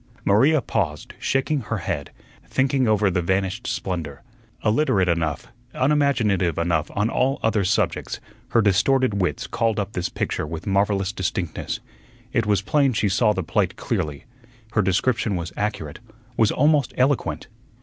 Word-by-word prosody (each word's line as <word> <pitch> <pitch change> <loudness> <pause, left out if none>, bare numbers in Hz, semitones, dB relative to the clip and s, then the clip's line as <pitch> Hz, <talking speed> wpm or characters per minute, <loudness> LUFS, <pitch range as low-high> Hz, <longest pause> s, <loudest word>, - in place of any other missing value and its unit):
Maria 135 +8 +4
paused, 80 -11 -2
shaking 135 +3 0
her 115 -2 -3
head, 75 -5 -3 0.4
thinking 135 -1 +1
over 105 -2 +3
the 90 0 0
vanished 95 +6 -1
splendor. 85 -2 -4 0.4
Illiterate 105 -5 +2
enough, 80 -4 -1 0.3
unimaginative 125 - +2
enough 85 -2 0
on 105 +1 +2
all 130 +3 +1
other 110 -2 +2
subjects, 95 - 0 0.3
her 115 - +3
distorted 100 +2 +2
wits 85 -5 -1
called 115 -2 0
up 100 +1 -3
this 90 - -2
picture - - -2
with 80 +1 -6
marvellous 100 -1 +1
distinctness. 90 -4 -3 0.5
It 115 -2 +1
was 100 -1 +2
plain 140 +3 +2
she 105 -2 +1
saw 105 +3 +3
the 95 - -2
plate - - 0
clearly. 75 +3 -3 0.5
Her 105 - +2
description 100 +3 +1
was 85 -1 -4
accurate, 100 -8 -3 0.4
was 110 -2 +3
almost 145 -1 +2
eloquent. 130 +1 +1
100 Hz, 145 wpm, -23 LUFS, 90-120 Hz, 0.5 s, Maria